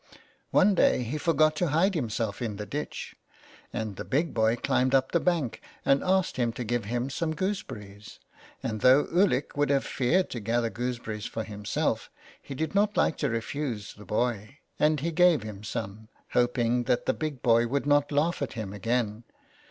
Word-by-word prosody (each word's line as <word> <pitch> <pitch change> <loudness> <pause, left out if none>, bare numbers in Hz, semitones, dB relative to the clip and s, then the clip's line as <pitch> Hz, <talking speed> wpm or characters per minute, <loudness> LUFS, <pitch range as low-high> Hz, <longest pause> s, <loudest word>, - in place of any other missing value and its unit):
One 200 +2 +4
day 125 - +3
he 135 +6 -3
forgot 155 -1 +3
to 175 - +1
hide 165 +7 +2
himself 115 - -2
in 110 -4 -2
the 105 +1 -5
ditch, 145 +6 -5 0.6
and 110 -3 -4
the - - -4
big 150 +3 0
boy 110 0 +3
climbed 130 +1 +1
up 130 0 +2
the 170 - +3
bank, 165 -9 0 0.2
and 135 0 +3
asked 185 -4 +1
him 120 -2 +1
to 120 - -4
give 120 -1 -1
him 120 +5 -2
some 160 +3 -2
gooseberries, 105 - -5 0.4
and 110 -2 -3
though 130 +3 +6
Ulick 175 -7 +2
would 145 0 +1
have 140 -1 +2
feared 165 +9 +1
to 120 - -3
gather 115 +2 0
gooseberries 115 -3 -4
for 110 - -4
himself 105 -1 -2 0.3
he 135 - -8
did 160 +6 -2
not 205 +1 +2
like - - +3
to - - 0
refuse 115 -1 -3
the 105 - -14
boy, 115 +4 -2 0.2
and 150 -2 +3
he 170 +3 -1
gave 170 -6 +4
him 105 -2 -8
some, 110 0 -5 0.2
hoping 120 0 +1
that 120 - +1
the - - +2
big 150 -5 -4
boy 115 0 +4
would 140 +4 -1
not 145 0 +3
laugh 150 +4 +1
at 140 - -2
him 110 -4 -5
again. 110 +1 -1
125 Hz, 185 wpm, -28 LUFS, 110-150 Hz, 0.6 s, though